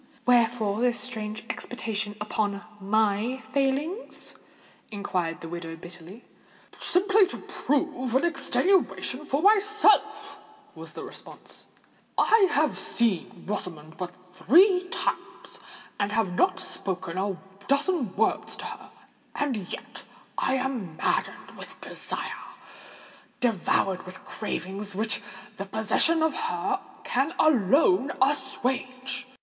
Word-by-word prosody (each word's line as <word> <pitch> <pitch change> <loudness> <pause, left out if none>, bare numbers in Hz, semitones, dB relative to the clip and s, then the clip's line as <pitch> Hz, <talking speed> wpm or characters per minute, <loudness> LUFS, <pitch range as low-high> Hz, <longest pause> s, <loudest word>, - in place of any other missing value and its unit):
"Wherefore 230 -3 +3
this 245 -1 +2
strange 215 -3 -4
expatiation 220 -5 -3
upon 205 -1 -1 0.2
my 215 +4 +1 0.2
failings?" 285 - 0 0.6
inquired 185 -6 -2
the 165 - -6
widow 165 -1 -6
bitterly. 175 +6 -11 0.5
"Simply 395 +2 +4
to - - -5
prove 260 -3 -1
an 270 - +4
extenuation 340 -4 +1
for 285 +3 0
myself," 425 0 +4 0.3
was - - -10
the - - -7
response. - - -9 0.5
"I 440 -3 +5
have 305 +1 +2
seen 230 -7 0
Rosamond 160 -6 -5
but 180 -1 -5 0.2
three 360 - +5
times, - - -4 0.4
and 200 0 +1
have 215 -4 +1
not 370 - +2
spoken 185 -2 -4
a 195 -1 -1 0.3
dozen 280 - +1
words 220 +2 +1
to - - -8
her; - - -8 0.5
and 285 -3 0 0.2
yet - - -7 0.3
I 265 - +1
am 250 -11 -3
maddened - - -1
with - - -10
desire—devoured 195 -4 -3
with 185 0 -10
cravings 200 -1 -4
which 215 +2 -1 0.4
the 195 - -4
possession 220 +10 +3
of 320 - +2
her 410 -3 -1 0.2
can 275 +7 0
alone 285 - +4
assuage. 265 -1 -1
245 Hz, 110 wpm, -27 LUFS, 200-305 Hz, 0.6 s, I